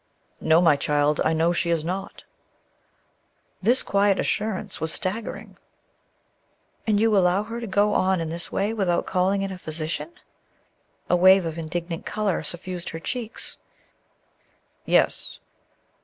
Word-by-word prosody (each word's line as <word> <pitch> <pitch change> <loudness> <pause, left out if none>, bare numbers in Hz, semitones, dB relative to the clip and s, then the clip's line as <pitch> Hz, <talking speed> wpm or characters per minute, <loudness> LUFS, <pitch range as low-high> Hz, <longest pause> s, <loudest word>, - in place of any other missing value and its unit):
"No, 160 +2 +4
my 165 -4 +5
child; 145 +1 +1
I - - +2
know 165 +2 +2
she 175 0 0
is 165 -2 +1
not." 190 +4 -5 1.4
This 240 +7 +3
quiet 200 -1 +2
assurance 205 -4 -2
was 160 0 +2
staggering. 205 +4 -4 1.3
"And 210 -2 +3
you 220 -1 +3
allow 185 +1 +3
her 230 +2 -6
to 230 - -5
go 205 +1 +2
on 185 -1 +2
in 165 -1 -3
this 170 +1 -5
way 205 +3 0
without 185 -6 0
calling 190 +2 +1
in 195 - -3
a 185 - -7
physician?" 160 - -4 1.0
A - - +3
wave 185 +1 +6
of 165 0 -4
indignant 170 +1 -4
color 210 -4 -1
suffused 175 +2 -5
her 165 - -6
cheeks. 230 +6 -5 1.3
"Yes." - - +1
185 Hz, 140 wpm, -24 LUFS, 165-205 Hz, 1.4 s, wave